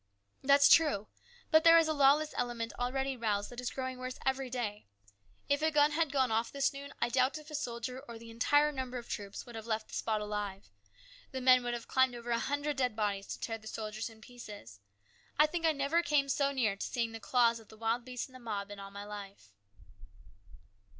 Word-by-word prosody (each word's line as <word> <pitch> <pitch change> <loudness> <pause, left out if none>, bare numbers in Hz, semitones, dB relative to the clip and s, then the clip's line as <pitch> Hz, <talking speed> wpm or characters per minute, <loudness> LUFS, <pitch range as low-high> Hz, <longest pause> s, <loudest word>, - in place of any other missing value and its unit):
"That's 280 +1 +6
true. 290 -11 +4 0.4
But 315 -1 +6
there 330 0 +8
is 330 -1 +4
a 315 - +1
lawless 290 +2 +4
element 240 -2 -2
already 265 +2 -1
roused 210 -3 -1
that 245 0 -6
is 250 - -2
growing 260 -1 -4
worse 255 0 -5
every 265 0 0
day. 220 - -4 0.6
If 285 +1 +1
a 315 - +3
gun 300 -1 +4
had 320 -1 +1
gone 265 -4 +2
off 225 +1 0
this 280 0 +1
noon, 280 0 -8
I - - +1
doubt 255 +4 +2
if 305 0 -12
a - - -9
soldier 250 -2 -4
of 235 -3 -10
the 230 0 -11
entire 290 +6 +3
number 260 -3 -4
of 235 - -8
troops 200 -1 -6
would 240 - -11
have 225 0 -7
left 220 -1 -2
the - - -14
spot 220 -2 -1
alive. 205 - -4 0.6
The 265 - -4
men 255 -1 +6
would 240 0 -1
have 235 - -7
climbed 260 -1 +3
over 240 0 -6
a 230 - +2
hundred 285 +2 -2
dead 250 -4 0
bodies 205 -2 -1
to - - -6
tear 225 -1 -4
the 220 - -13
soldiers 215 +1 -4
in 220 -1 -16
pieces. 210 - -11 0.6
I 300 - +7
think 330 +1 0
I - - +5
never 290 +3 +1
came 285 -3 +1
so 280 +1 +2
near 235 -7 +1
to - - -5
seeing 230 -2 -1
the 225 - -7
claws 235 -1 +3
of 220 - -17
the 220 - -15
wild 230 +2 0
beast 250 0 -5
in 260 - -21
the 255 - -11
mob 205 -4 -4
in 205 - -8
all 195 0 -8
my 200 +1 -8
life." 200 - -10
245 Hz, 225 wpm, -32 LUFS, 220-275 Hz, 0.6 s, there